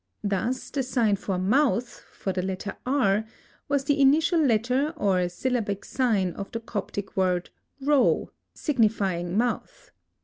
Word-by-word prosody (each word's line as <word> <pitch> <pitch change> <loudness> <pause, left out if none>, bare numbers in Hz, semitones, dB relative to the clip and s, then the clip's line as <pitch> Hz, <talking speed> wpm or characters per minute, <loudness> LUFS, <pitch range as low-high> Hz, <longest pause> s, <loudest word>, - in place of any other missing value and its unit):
Thus, 210 +6 -2
the 280 - 0
sign 240 -5 +1
for 195 -1 -3
"mouth" 245 +5 +1
for 190 - -4
the 185 - -1
letter 190 +1 -4
R, 220 -7 +2 0.5
was 280 -1 +1
the 280 +1 +1
initial 315 +5 +4
letter 255 +5 +1
or 185 -7 +1
syllabic 205 0 -2
sign 210 -9 +1
of 200 - -7
the 230 - -3
Coptic 205 -3 -5
word 180 -2 0 0.3
Ro, 280 -1 +2 0.2
signifying 200 - 0
mouth. 245 - -2
225 Hz, 135 wpm, -26 LUFS, 195-265 Hz, 0.5 s, initial